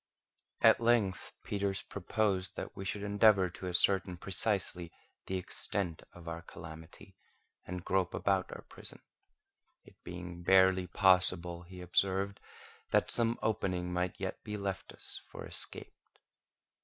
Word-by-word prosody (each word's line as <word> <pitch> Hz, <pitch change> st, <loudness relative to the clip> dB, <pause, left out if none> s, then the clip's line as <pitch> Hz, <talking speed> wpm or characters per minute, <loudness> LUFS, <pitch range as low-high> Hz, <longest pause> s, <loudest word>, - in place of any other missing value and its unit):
At -, -, +6 dB
length 115 Hz, -6 st, +2 dB
Peters 100 Hz, -1 st, -2 dB
proposed 100 Hz, -1 st, -1 dB
that -, -, -6 dB
we 95 Hz, -, -6 dB
should 100 Hz, +1 st, -3 dB
endeavour 100 Hz, -2 st, +4 dB
to 90 Hz, -, -7 dB
ascertain 90 Hz, 0 st, +2 dB
precisely 95 Hz, -2 st, -1 dB, 0.4 s
the 95 Hz, -, -1 dB
extent 90 Hz, -1 st, -3 dB
of 90 Hz, -1 st, -13 dB
our 85 Hz, 0 st, -4 dB
calamity, 80 Hz, 0 st, -11 dB, 0.5 s
and 90 Hz, 0 st, -5 dB
grope 95 Hz, -2 st, +1 dB
about 95 Hz, -2 st, +1 dB
our -, -, -8 dB
prison; -, -, -8 dB, 0.8 s
it -, -, -19 dB
being 85 Hz, 0 st, -7 dB
barely 95 Hz, 0 st, +5 dB
possible, 90 Hz, -2 st, +3 dB
he 90 Hz, +1 st, -11 dB
observed, 95 Hz, +2 st, +2 dB, 0.5 s
that -, -, +2 dB
some 115 Hz, 0 st, +4 dB
opening 90 Hz, -5 st, -1 dB
might 90 Hz, 0 st, -1 dB
yet 95 Hz, -1 st, -4 dB
be 105 Hz, -1 st, -4 dB
left 100 Hz, -2 st, -4 dB
us -, -, -6 dB
for -, -, -8 dB
escape. -, -, 0 dB
95 Hz, 130 wpm, -33 LUFS, 90-100 Hz, 0.8 s, At